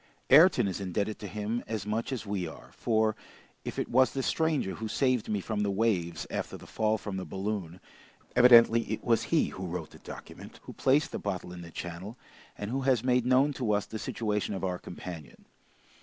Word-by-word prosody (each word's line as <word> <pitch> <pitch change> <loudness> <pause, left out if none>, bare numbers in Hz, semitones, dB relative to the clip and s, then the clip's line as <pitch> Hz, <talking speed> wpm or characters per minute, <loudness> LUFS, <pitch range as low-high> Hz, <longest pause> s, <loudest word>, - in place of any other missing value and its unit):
Ayrton 140 - +7
is 95 +1 -3
indebted 100 +3 -2
to 105 - -6
him 105 +4 -3
as 110 -3 -3
much 110 +5 -2
as 125 -4 -3
we 100 -4 -2
are, 80 - -11
for, 110 -1 +1 0.5
if - - -5
it - - -1
was 130 +2 +3
the 135 - -2
stranger 160 -12 0
who 110 - -5
saved 130 -1 +1
me 105 -2 0
from 110 +2 -3
the 105 - +1
waves 95 -5 0
after - - -3
the - - -13
fall 110 0 0
from 100 -2 -5
the 95 - -3
balloon, 95 -3 -4 0.6
evidently 120 -2 +8
it - - -3
was 115 -1 +2
he 165 - +2
who 95 0 -6
wrote 90 +1 -5
the - - -14
document, - - -10
who - - -9
placed 140 +4 +2
the - - -4
bottle 90 -3 -4
in 90 - -8
the 85 - -9
channel, 90 +7 -7 0.4
and 105 +2 -4
who 135 +2 -1
has 130 -3 +2
made 125 -1 +2
known 135 +3 +4
to 120 -6 0
us 105 0 +1
the 110 - -6
situation 105 -2 -2
of 95 - -5
our 90 -1 -1
companion. 85 -5 -9
110 Hz, 205 wpm, -29 LUFS, 95-125 Hz, 0.6 s, evidently